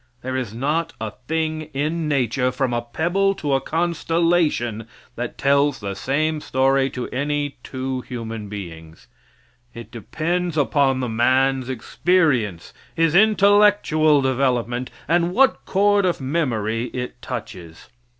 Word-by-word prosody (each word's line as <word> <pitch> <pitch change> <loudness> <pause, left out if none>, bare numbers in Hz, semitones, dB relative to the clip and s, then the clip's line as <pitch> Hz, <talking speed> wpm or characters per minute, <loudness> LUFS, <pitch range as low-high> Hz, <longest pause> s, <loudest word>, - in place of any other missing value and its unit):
There 130 +1 -3
is 125 -5 -3
not 150 +8 -1
a 110 -1 -4 0.2
thing 155 -1 -2
in 155 +3 -1
nature, 130 -2 +1
from 125 -1 -1
a 120 - 0
pebble 175 +11 0
to 150 -7 -2
a 135 - +2
constellation, 165 -8 0 0.3
that 120 +1 -5
tells 140 -1 +2
the 100 -2 -4
same 150 +8 -1
story 135 0 +2
to 125 -2 -5
any 145 +1 -2
two 130 -1 -4
human 115 -4 -6
beings. 80 -5 -9 0.7
It 115 0 -10
depends 165 - -2
upon 140 -2 +2
the 125 - -1
man's 130 +3 +1
experience, 130 - 0 0.2
his 165 -1 +2
intellectual 200 -7 +4
development, 125 -2 0 0.2
and 170 +2 +1
what 265 +2 +3
chord 205 +1 +3
of 180 -2 0
memory 120 -6 -1
it 125 0 -6
touches. 90 -9 -8
135 Hz, 130 wpm, -22 LUFS, 120-160 Hz, 0.7 s, intellectual